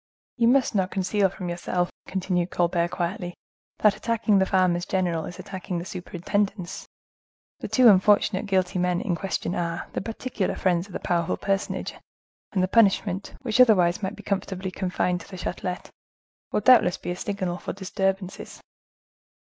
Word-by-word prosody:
"You 235 Hz, -1 st, +3 dB
must 255 Hz, +1 st, +3 dB
not 190 Hz, -3 st, +1 dB
conceal 195 Hz, +1 st, +1 dB
from 185 Hz, -1 st, -7 dB
yourself," 175 Hz, +1 st, -1 dB, 0.2 s
continued 180 Hz, -2 st, -1 dB
Colbert 170 Hz, -1 st, +1 dB
quietly, 175 Hz, 0 st, -3 dB, 0.4 s
"that 210 Hz, -1 st, +4 dB
attacking 225 Hz, -3 st, +1 dB
the 190 Hz, -, +2 dB
farmers 180 Hz, -2 st, +2 dB
general 175 Hz, -4 st, 0 dB
is 180 Hz, -, -8 dB
attacking 185 Hz, -2 st, -5 dB
the 170 Hz, -, -4 dB
superintendence. 185 Hz, +1 st, -3 dB, 0.7 s
The -, -, -5 dB
two 255 Hz, -2 st, +5 dB
unfortunate 205 Hz, 0 st, +4 dB
guilty 185 Hz, -2 st, +1 dB
men 180 Hz, 0 st, +1 dB
in 180 Hz, -, -1 dB
question 190 Hz, -1 st, -3 dB
are 170 Hz, -1 st, -3 dB
the -, -, -2 dB
particular 225 Hz, -1 st, -3 dB
friends 180 Hz, +1 st, 0 dB
of 185 Hz, -, -10 dB
a -, -, -2 dB
powerful 170 Hz, -2 st, 0 dB
personage, 195 Hz, 0 st, -2 dB, 0.6 s
and 185 Hz, -2 st, +1 dB
the -, -, +2 dB
punishment, 195 Hz, -2 st, +2 dB
which 245 Hz, 0 st, +3 dB
otherwise 185 Hz, -6 st, +5 dB
might 190 Hz, -, -3 dB
be -, -, -12 dB
comfortably 190 Hz, -1 st, -3 dB
confined 180 Hz, -1 st, -1 dB
to -, -, -13 dB
the 185 Hz, -, -8 dB
Chatlet, 180 Hz, 0 st, -4 dB, 0.6 s
will -, -, +1 dB
doubtless 225 Hz, -6 st, +6 dB
be 175 Hz, -, -5 dB
a -, -, -3 dB
signal 185 Hz, -2 st, -3 dB
for -, -, -5 dB
disturbances!" 190 Hz, 0 st, -3 dB
185 Hz, 160 wpm, -25 LUFS, 180-200 Hz, 0.7 s, doubtless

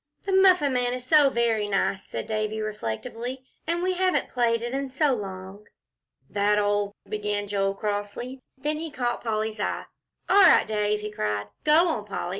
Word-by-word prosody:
"The 395 Hz, -, -3 dB
Muffin 365 Hz, -7 st, +5 dB
Man 245 Hz, 0 st, 0 dB
is 250 Hz, 0 st, -8 dB
so 290 Hz, +1 st, +6 dB
very 230 Hz, -4 st, +1 dB
nice," 195 Hz, -1 st, 0 dB
said -, -, -5 dB
Davie, 215 Hz, 0 st, -2 dB
reflectively, 230 Hz, -, -5 dB, 0.2 s
"and 340 Hz, +1 st, 0 dB
we 370 Hz, 0 st, +1 dB
haven't 370 Hz, 0 st, 0 dB
played 230 Hz, -2 st, +1 dB
it 240 Hz, +1 st, -3 dB
in 275 Hz, 0 st, -2 dB
so 275 Hz, +1 st, +2 dB
long." 195 Hz, -1 st, -7 dB, 0.6 s
"That 205 Hz, +1 st, +1 dB
old 205 Hz, 0 st, 0 dB
" -, -, -30 dB
began 205 Hz, -1 st, -2 dB
Joel, 195 Hz, -1 st, 0 dB
crossly. 205 Hz, +5 st, -4 dB, 0.2 s
Then 300 Hz, +3 st, -2 dB
he 325 Hz, 0 st, -4 dB
caught 245 Hz, -4 st, -2 dB
Polly's 220 Hz, -1 st, -2 dB
eye. -, -, -2 dB, 0.4 s
"All 405 Hz, -, +6 dB
right, 375 Hz, -, +7 dB
Dave," 210 Hz, -1 st, 0 dB
he 210 Hz, 0 st, -5 dB
cried. 105 Hz, -, -2 dB
"Go 315 Hz, +4 st, +5 dB
on, 225 Hz, -11 st, -2 dB
Polly. 200 Hz, -3 st, -4 dB
220 Hz, 180 wpm, -26 LUFS, 205-270 Hz, 0.6 s, right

